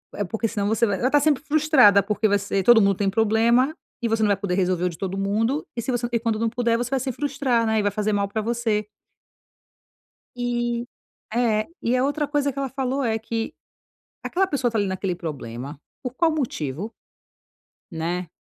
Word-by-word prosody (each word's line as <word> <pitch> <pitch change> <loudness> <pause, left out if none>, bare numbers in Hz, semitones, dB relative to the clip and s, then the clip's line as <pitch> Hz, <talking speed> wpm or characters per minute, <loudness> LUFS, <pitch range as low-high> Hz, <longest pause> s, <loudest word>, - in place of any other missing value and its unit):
é 205 - -1
porque, 225 +4 -2
senão, 205 -2 -2
você 225 +2 +2
vai 200 -2 0
Ela 250 - +2
está 290 +2 +4
sempre 290 -1 +2
frustrada, 290 -10 +5
porque 215 0 +1
você 200 -1 0
todo 235 0 +7
mundo 200 -1 +3
tem 195 0 0
problema 230 +6 +3 0.3
e 235 - 0
você 225 -1 +1
não - - +4
vai 200 -1 +2
poder 195 -3 -2
resolver 180 -2 +1
o - - +2
de 165 - -9
todo 195 +2 -3
mundo, 225 +9 0
e, 235 - -2
se 255 - -2
você 240 0 -1
e 235 - +1
quando 225 -2 -1
não 230 0 +1
puder, 230 0 +1
você 240 0 -2
vai 270 0 0
se 260 +1 -2
frustrar, 265 -3 0
né, 220 0 +2
e - - +2
vai 205 - +1
fazer 210 0 -1
mal 200 -1 +1
pra 215 +2 -2
você". 220 -2 -1 1.5
E 240 -1 -1 0.5
É. 225 -3 +2 0.2
E 240 +2 +1
a 255 - +2
outra 290 +1 0
coisa 290 -1 0
que 275 - -6
ela 275 - -2
falou 265 +1 -2
é 225 -2 +1
que: 225 0 -3 0.7
"Aquela 385 +2 +1
pessoa 275 -7 0
está 225 - -2
ali 200 - +1
naquele 190 -1 -2
problema 140 -4 -6 0.2
por 250 -2 -5
qual 330 +3 +2
motivo?" 205 - -3 1.0
Né? 170 +2 -3
225 Hz, 210 wpm, -23 LUFS, 200-250 Hz, 1.5 s, todo